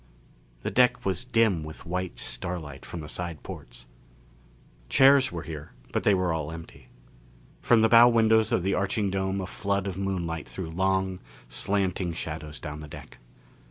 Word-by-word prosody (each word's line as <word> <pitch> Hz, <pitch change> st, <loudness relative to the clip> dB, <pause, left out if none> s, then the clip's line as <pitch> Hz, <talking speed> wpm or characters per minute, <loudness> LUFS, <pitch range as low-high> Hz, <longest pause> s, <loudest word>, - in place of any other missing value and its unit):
The -, -, -2 dB
deck 125 Hz, 0 st, +3 dB
was 100 Hz, +6 st, -1 dB
dim 115 Hz, -9 st, +2 dB
with 80 Hz, +3 st, -9 dB
white 90 Hz, +1 st, -3 dB
starlight 75 Hz, -6 st, -4 dB
from 85 Hz, -, -6 dB
the 75 Hz, -, -8 dB
side 85 Hz, -2 st, -5 dB
ports. -, -, -10 dB, 1.0 s
Chairs 135 Hz, 0 st, +6 dB
were 85 Hz, -2 st, -5 dB
here 75 Hz, -3 st, -8 dB, 0.2 s
but -, -, +1 dB
they 100 Hz, -, +4 dB
were 90 Hz, -2 st, +1 dB
all 80 Hz, -1 st, -3 dB
empty. 80 Hz, 0 st, -11 dB, 0.7 s
From 120 Hz, -2 st, +4 dB
the 110 Hz, -, +5 dB
bow 120 Hz, +1 st, +8 dB
windows 110 Hz, -2 st, +4 dB
of 90 Hz, -, +2 dB
the 95 Hz, +1 st, +1 dB
arching 100 Hz, 0 st, 0 dB
dome 95 Hz, 0 st, -1 dB
a 95 Hz, -, -3 dB
flood 100 Hz, +1 st, -2 dB
of 95 Hz, -2 st, -4 dB
moonlight 85 Hz, -5 st, -2 dB
threw 85 Hz, -4 st, -6 dB
long, 95 Hz, +1 st, 0 dB, 0.3 s
slanting 95 Hz, +1 st, -1 dB
shadows 75 Hz, -1 st, -5 dB
down 75 Hz, 0 st, -6 dB
the 75 Hz, -, -8 dB
deck. -, -, -11 dB
95 Hz, 165 wpm, -27 LUFS, 80-100 Hz, 1.0 s, bow